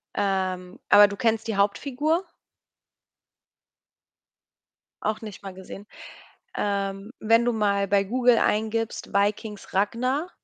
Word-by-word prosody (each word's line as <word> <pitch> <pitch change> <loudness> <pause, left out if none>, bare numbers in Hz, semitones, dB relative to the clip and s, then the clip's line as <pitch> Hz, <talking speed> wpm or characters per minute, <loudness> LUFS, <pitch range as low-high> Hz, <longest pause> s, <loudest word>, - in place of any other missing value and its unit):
Ähm, 185 -2 -2
aber 205 0 +8
du 200 - -6
kennst 225 -2 0
die 220 -3 -2
Hauptfigur? 280 - 0 2.8
Auch 215 0 -1
nicht 210 -3 -9
mal 195 -1 -7
gesehen. 190 +2 -10 0.7
Ähm, 200 0 -2
wenn 230 +2 +3
du 240 - +1
mal 200 -2 +1
bei 195 0 +3
Google 245 +3 +3
eingibst, 220 +1 -1
„Vikings 205 +1 -1
Ragnar“ 255 - 0
210 Hz, 110 wpm, -25 LUFS, 200-230 Hz, 2.8 s, aber